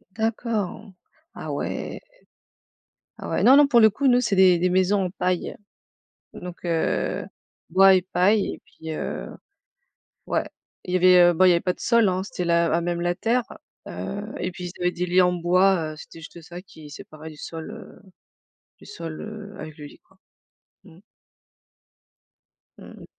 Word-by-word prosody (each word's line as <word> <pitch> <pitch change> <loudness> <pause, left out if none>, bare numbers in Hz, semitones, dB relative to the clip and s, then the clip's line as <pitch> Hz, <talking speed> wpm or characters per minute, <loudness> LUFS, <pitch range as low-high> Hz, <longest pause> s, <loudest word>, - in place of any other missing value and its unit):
D'accord. 220 -2 -3 0.4
Ah - - -7
ouais. - - -4 1.2
Ah - - -7
ouais. - - -1
Non, 260 - +8
non, 290 +1 +7
pour 245 -4 +4
le 220 -1 +7
coup, 270 +7 -1
nous, 245 -1 +5
c'est 215 -5 0
des 185 -2 +6
des 180 - +1
maisons 190 +2 +2
en 180 - -2
paille 180 -1 -2 0.8
donc 180 -1 -9
heu, 165 -2 -1 0.4
bois 190 +2 +6
et 185 - +2
paille 190 +3 +1
et - - -12
puis 160 0 -10
heu, - - -5 1.0
ouais, - - 0 0.4
il 180 - -5
y 185 - +4
avait, 185 0 +6
heu, - - -2
bon, 185 +3 +4
il 185 - +7
y - - +6
avait 170 - +2
pas 180 - 0
de - - -24
sol, 235 -2 +3
hein, 185 +1 -1
c'était 180 -3 -5
la 170 -1 +2
à - - +2
même 170 0 -2
la 175 0 0
terre, 230 +6 +1 0.5
heu 95 - -5 0.2
et 180 - -3
puis, 180 0 -8
ils 175 - -11
avaient 180 0 +1
des 180 +1 -3
lits 180 +1 +4
en 180 - +2
bois, 175 -1 +2
heu, - - -11
c'était 165 - -12
juste 165 +1 -12
ça 175 +2 -10
qui 160 -5 -14
séparait 155 +2 -11
du 150 - -14
sol, 160 +1 -8
heu, - - -12 0.8
du - - -16
sol, 165 -2 -8
heu, 210 -2 -9
avec 155 0 -9
le 150 - -8
lit, - - -15
quoi. 190 - -30 0.7
Mmh. 175 -1 -17 1.8
Mmh - - -12
mh. - - -12
180 Hz, 185 wpm, -24 LUFS, 170-200 Hz, 1.8 s, Non